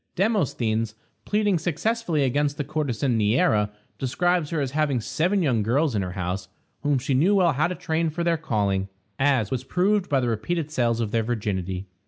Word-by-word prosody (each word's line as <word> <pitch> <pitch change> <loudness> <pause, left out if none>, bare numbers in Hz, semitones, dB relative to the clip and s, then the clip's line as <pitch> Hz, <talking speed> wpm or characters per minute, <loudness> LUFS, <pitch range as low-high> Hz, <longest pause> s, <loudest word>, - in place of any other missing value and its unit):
Demosthenes, 120 - 0 0.3
pleading 205 -4 +1
successfully 175 0 0
against 145 +2 +1
the 150 - -1
courtesan 140 -5 -1
Neæra, 105 -1 +3 0.3
describes 175 +4 +1
her 165 - -1
as 135 -3 -1
having 145 -3 +1
seven 180 - 0
young 125 -7 +2
girls 135 +7 +1
in 105 - 0
her 90 -1 -4
house, 90 +1 -3 0.3
whom 145 -1 +2
she 135 +2 -1
knew 170 +11 +4
well 175 -5 +4
how 150 +5 +2
to 180 - -4
train 165 -2 -1
for 170 +3 -3
their 170 -1 +2
calling, 100 -10 -1 0.3
as 135 -6 +2
was 130 -1 -2
proved 190 +7 +1
by 140 - +3
the 125 - 0
repeated 150 +8 -2
sales 120 -5 +1
of 110 -3 -2
their 115 - +2
virginity. 100 -5 -2
140 Hz, 185 wpm, -25 LUFS, 115-165 Hz, 0.3 s, knew